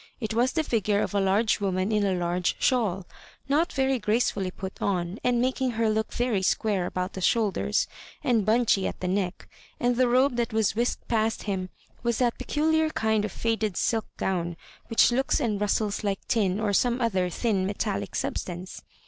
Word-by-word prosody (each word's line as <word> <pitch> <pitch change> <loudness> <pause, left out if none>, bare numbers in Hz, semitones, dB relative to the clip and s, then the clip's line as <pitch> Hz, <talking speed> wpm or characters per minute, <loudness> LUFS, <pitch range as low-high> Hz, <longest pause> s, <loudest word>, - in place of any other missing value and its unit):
It 220 -3 -3
was 245 +4 +2
the 320 - +1
figure 210 -6 +1
of - - -2
a 200 - +2
large 200 +4 +2
woman 190 0 0
in 210 -1 +2
a 195 -2 +1
large 175 0 0
shawl, 205 -8 +1 0.4
not 300 +5 +2
very 265 -1 +1
gracefully 210 -3 0
put 190 +1 -8
on, 180 0 -1
and 245 -1 +2
making 255 +1 0
her 225 -1 +2
look 220 0 -1
very 240 -5 0
square 190 -1 +1
/ibout 185 +1 -3
the 190 - -7
shoulders 200 - +1 0.4
and 230 -4 +2
bunchy 215 -2 +2
at - - -6
the 185 - -3
neck; 185 -1 -2 0.3
and 245 0 +1
the 255 0 +4
robe 250 +1 +3
that 235 -1 -1
was 220 -2 +1
whisked 235 +2 -1
past 225 -1 0
him 190 -3 -3 0.3
was 235 -1 0
that 240 -2 +1
peculiar 315 +1 +1
kind 220 -7 +1
of 210 - -5
faded 220 -3 -1
silk 225 -2 0
gown 175 -3 -2 0.3
which 230 - +4
looks 265 +3 +1
and 215 -7 -1
rustles 210 0 0
like 200 -2 -2
tin, 200 -4 +1
or 210 -2 0
some 245 +4 +2
other 190 -7 +1
thin 195 -1 0
metallic 200 -1 -3
substance. 180 +1 -4
215 Hz, 185 wpm, -26 LUFS, 190-240 Hz, 0.4 s, the